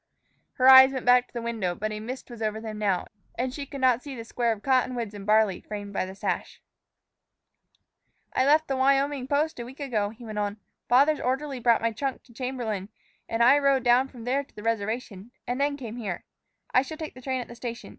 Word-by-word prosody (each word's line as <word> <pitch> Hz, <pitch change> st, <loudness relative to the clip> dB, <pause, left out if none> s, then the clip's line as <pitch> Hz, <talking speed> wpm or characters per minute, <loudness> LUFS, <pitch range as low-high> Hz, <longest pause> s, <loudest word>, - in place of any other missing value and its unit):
Her 255 Hz, -, +3 dB
eyes 265 Hz, 0 st, +10 dB
went 260 Hz, -2 st, -4 dB
back 250 Hz, 0 st, +5 dB
to -, -, -31 dB
the 235 Hz, -, -3 dB
window, 220 Hz, -7 st, -2 dB
but 215 Hz, +3 st, -3 dB
a 210 Hz, -, -4 dB
mist 250 Hz, +3 st, -7 dB
was 235 Hz, -1 st, -9 dB
over 215 Hz, 0 st, -1 dB
them 220 Hz, -1 st, -6 dB
now, 200 Hz, -4 st, 0 dB, 0.3 s
and 250 Hz, +2 st, -2 dB
she 280 Hz, 0 st, -6 dB
could 275 Hz, 0 st, -7 dB
not 255 Hz, -2 st, +4 dB
see 280 Hz, -1 st, -8 dB
the 230 Hz, -2 st, -7 dB
square 235 Hz, 0 st, 0 dB
of 215 Hz, -2 st, -5 dB
cottonwoods 250 Hz, -4 st, +1 dB
and 200 Hz, -1 st, -9 dB
barley 215 Hz, -3 st, +3 dB
framed 205 Hz, -1 st, -7 dB
by 185 Hz, -, -1 dB
the 190 Hz, -, -9 dB
sash. -, -, -3 dB, 1.7 s
"I -, -, +2 dB
left 305 Hz, +3 st, +4 dB
the 270 Hz, -, -1 dB
Wyoming 275 Hz, 0 st, +2 dB
post 295 Hz, +1 st, 0 dB
a -, -, -3 dB
week 255 Hz, +4 st, -11 dB
ago," 225 Hz, -8 st, -1 dB
he 230 Hz, +3 st, -12 dB
went 215 Hz, -1 st, -4 dB
on. 205 Hz, 0 st, -2 dB, 0.3 s
"Father's 280 Hz, +5 st, +5 dB
orderly 265 Hz, +1 st, -2 dB
brought 235 Hz, -1 st, +3 dB
my 230 Hz, -, +2 dB
trunk 265 Hz, +4 st, -4 dB
to 240 Hz, -, -20 dB
Chamberlain, 230 Hz, -6 st, -4 dB, 0.4 s
and 230 Hz, +1 st, +1 dB
I 270 Hz, +4 st, +6 dB
rode 275 Hz, -2 st, +2 dB
down 250 Hz, +2 st, +4 dB
from 245 Hz, -4 st, -12 dB
there 265 Hz, +4 st, 0 dB
to -, -, -26 dB
the 210 Hz, -, -9 dB
reservation 220 Hz, -1 st, -3 dB, 0.2 s
and 250 Hz, +2 st, -2 dB
then 285 Hz, 0 st, +1 dB
came 240 Hz, -4 st, -7 dB
here. 200 Hz, -7 st, -4 dB, 0.5 s
I 255 Hz, -, +6 dB
shall 290 Hz, +4 st, -7 dB
take 315 Hz, -1 st, -6 dB
the 255 Hz, -, -12 dB
train 260 Hz, 0 st, -2 dB
at 245 Hz, -, -6 dB
the -, -, -10 dB
station. 235 Hz, 0 st, -7 dB
245 Hz, 225 wpm, -26 LUFS, 220-265 Hz, 1.7 s, eyes